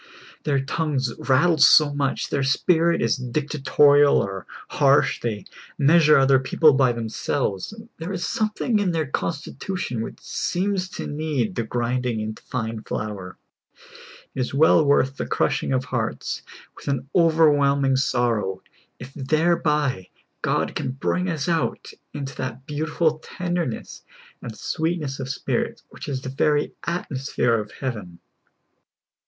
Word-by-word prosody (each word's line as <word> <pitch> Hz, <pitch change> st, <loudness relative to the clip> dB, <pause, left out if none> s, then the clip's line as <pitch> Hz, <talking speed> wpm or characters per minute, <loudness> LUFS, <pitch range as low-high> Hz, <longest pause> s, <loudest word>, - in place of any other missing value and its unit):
Their 140 Hz, -2 st, +2 dB
tongues 135 Hz, -3 st, -1 dB
rattle 155 Hz, +5 st, +3 dB
so 145 Hz, 0 st, +7 dB
much, 140 Hz, -1 st, -1 dB
their 140 Hz, -, 0 dB
spirit 165 Hz, +5 st, +2 dB
is -, -, +1 dB
dictatorial 145 Hz, +2 st, +3 dB
or 95 Hz, -1 st, -3 dB, 0.2 s
harsh, -, -, +3 dB
they 105 Hz, -4 st, -3 dB, 0.3 s
measure 155 Hz, +1 st, +5 dB
other 135 Hz, -1 st, +5 dB
people 150 Hz, +3 st, +4 dB
by 130 Hz, -2 st, +3 dB
themselves; 115 Hz, -2 st, -2 dB, 0.3 s
there 165 Hz, +4 st, -5 dB
is 185 Hz, -3 st, -3 dB
something 215 Hz, +1 st, 0 dB
in 190 Hz, -4 st, 0 dB
their 160 Hz, -2 st, 0 dB
constitution 145 Hz, -2 st, -3 dB
which -, -, -7 dB
seems 185 Hz, 0 st, -2 dB
to -, -, -4 dB
need 145 Hz, -6 st, -2 dB
the -, -, -1 dB
grinding 120 Hz, 0 st, -1 dB
into 110 Hz, 0 st, -5 dB
fine 110 Hz, -3 st, -4 dB
flour. 100 Hz, -5 st, -5 dB, 1.0 s
It -, -, -6 dB
is 130 Hz, +1 st, -2 dB
well 160 Hz, +2 st, +5 dB
worth 140 Hz, -2 st, +2 dB
the -, -, -3 dB
crushing -, -, 0 dB
of 130 Hz, -1 st, 0 dB
hearts -, -, -3 dB, 0.3 s
with -, -, -14 dB
an 135 Hz, -2 st, -1 dB
over 165 Hz, -2 st, +5 dB
whelming 140 Hz, -2 st, +2 dB
sorrow, 115 Hz, -8 st, 0 dB, 0.3 s
if 130 Hz, +2 st, -10 dB
thereb}^ 150 Hz, -, 0 dB, 0.3 s
God -, -, 0 dB
can 130 Hz, -, -3 dB
bring 180 Hz, +7 st, -1 dB
us 160 Hz, -3 st, -2 dB
out 165 Hz, -2 st, -1 dB, 0.2 s
into 140 Hz, -1 st, -6 dB
that 130 Hz, 0 st, -5 dB
beautiful 155 Hz, +1 st, -1 dB
tenderness 175 Hz, -6 st, -4 dB, 0.4 s
and 110 Hz, -3 st, -8 dB
sweetness 160 Hz, -4 st, -2 dB
of 135 Hz, -1 st, -5 dB
spirit 140 Hz, -, -2 dB
which -, -, -9 dB
is 130 Hz, -1 st, -3 dB
the 130 Hz, -, -4 dB
very 145 Hz, +2 st, +1 dB
atmosphere 135 Hz, -7 st, -1 dB
of 105 Hz, -1 st, -6 dB
heaven. 105 Hz, -10 st, -5 dB
140 Hz, 135 wpm, -23 LUFS, 125-160 Hz, 1.0 s, so